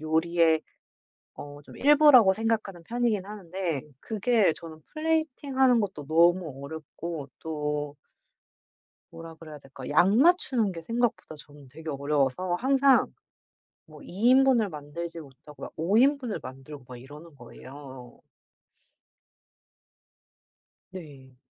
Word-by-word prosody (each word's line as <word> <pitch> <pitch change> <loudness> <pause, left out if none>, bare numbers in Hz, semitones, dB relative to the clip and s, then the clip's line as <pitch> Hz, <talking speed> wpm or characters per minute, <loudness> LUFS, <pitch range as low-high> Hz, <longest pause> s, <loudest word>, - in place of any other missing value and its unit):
요리의 160 0 +1 0.7
어 145 0 -10
좀 - - -14
일부라고 280 -8 +6
생각하는 215 -5 -2
편이긴 230 -2 -1
하는데 185 -6 -5 0.2
그게 220 -3 +1
저는 160 -1 -11
플레이팅하는 285 -5 +1
것도 190 -9 -4
너무 165 -3 +2
어렵고 160 0 -7
또 150 -2 -4 1.2
뭐라 165 0 -11
그래야 155 -2 -12
될까? 135 -2 -11
양 175 +7 +3
맞추는 265 - +3
게 165 -2 -8
생각보다 230 -3 -2
저는 145 -2 -16
되게 160 +4 -11
어려워서 145 +4 -1
항상 270 +5 +3 0.7
뭐 - - -15
2 210 +7 0
인분을 260 -4 +4
만들지 165 +3 -7
못하고 145 0 -15
막 - - -10
5 180 +7 +1
인분을 265 -3 +1
만들고 135 +2 -11
막 125 - -9
이러는 150 +6 -13
거예요. 130 0 -12 2.7
네. 140 -8 -12
170 Hz, 245 characters per minute, -26 LUFS, 145-225 Hz, 2.7 s, 일부라고